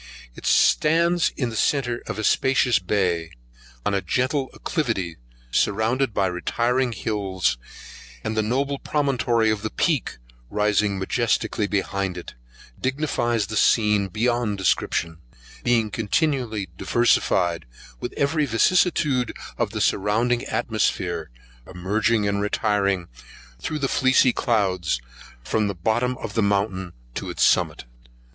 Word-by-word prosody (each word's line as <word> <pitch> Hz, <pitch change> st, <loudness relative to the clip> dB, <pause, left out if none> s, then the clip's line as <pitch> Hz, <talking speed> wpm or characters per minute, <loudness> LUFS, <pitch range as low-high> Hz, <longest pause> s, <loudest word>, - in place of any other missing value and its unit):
It -, -, -7 dB
stands 170 Hz, +2 st, +3 dB
in 125 Hz, -4 st, -1 dB
the -, -, -7 dB
centre 120 Hz, 0 st, 0 dB
of -, -, -4 dB
a 110 Hz, -, -3 dB
spacious 130 Hz, 0 st, +3 dB
bay, 90 Hz, -4 st, -1 dB, 0.5 s
on 105 Hz, -, +1 dB
a 100 Hz, -, +1 dB
gentle 130 Hz, +4 st, 0 dB
acclivity 110 Hz, -, -2 dB, 0.3 s
surrounded 110 Hz, +4 st, +1 dB
with 95 Hz, -2 st, +2 dB
retiring 120 Hz, +7 st, 0 dB
hills, 95 Hz, -, -1 dB, 0.6 s
and 110 Hz, -, -2 dB
the 110 Hz, -, +2 dB
noble 135 Hz, +5 st, -1 dB
promontory 120 Hz, -6 st, +1 dB
of 110 Hz, -1 st, -2 dB
the 110 Hz, -, -3 dB
Peek 150 Hz, -, 0 dB, 0.3 s
rising 105 Hz, -1 st, +1 dB
majestically 110 Hz, +1 st, 0 dB
behind 100 Hz, -2 st, -2 dB
it, 90 Hz, -, -8 dB, 0.5 s
dignifies 130 Hz, -5 st, 0 dB
the 110 Hz, -, -6 dB
scene 105 Hz, -2 st, +3 dB
beyond 115 Hz, +1 st, 0 dB
description, 85 Hz, -3 st, 0 dB, 0.4 s
being 115 Hz, -3 st, +2 dB
continually 115 Hz, -, -1 dB
diversified 90 Hz, -, +2 dB, 0.3 s
with -, -, -4 dB
every 145 Hz, +1 st, +1 dB
vicissitude 135 Hz, -1 st, +2 dB, 0.2 s
of -, -, +1 dB
the -, -, -4 dB
surrounding 115 Hz, +5 st, +1 dB
atmosphere, 90 Hz, -, -1 dB, 0.4 s
emerging 105 Hz, +4 st, 0 dB
and 100 Hz, 0 st, 0 dB
retiring 100 Hz, -3 st, 0 dB, 0.5 s
thro' 155 Hz, -, -3 dB
the 140 Hz, -2 st, 0 dB
fleecy 130 Hz, -1 st, +4 dB
clouds, 95 Hz, -, 0 dB, 0.4 s
from 105 Hz, +7 st, 0 dB
the 100 Hz, -, -3 dB
bottom 120 Hz, +8 st, 0 dB
of 105 Hz, -, -6 dB
the 115 Hz, -, +1 dB
mountain 100 Hz, -3 st, 0 dB, 0.2 s
to -, -, -5 dB
its -, -, -1 dB
summit. -, -, +2 dB
110 Hz, 125 wpm, -23 LUFS, 100-125 Hz, 0.6 s, fleecy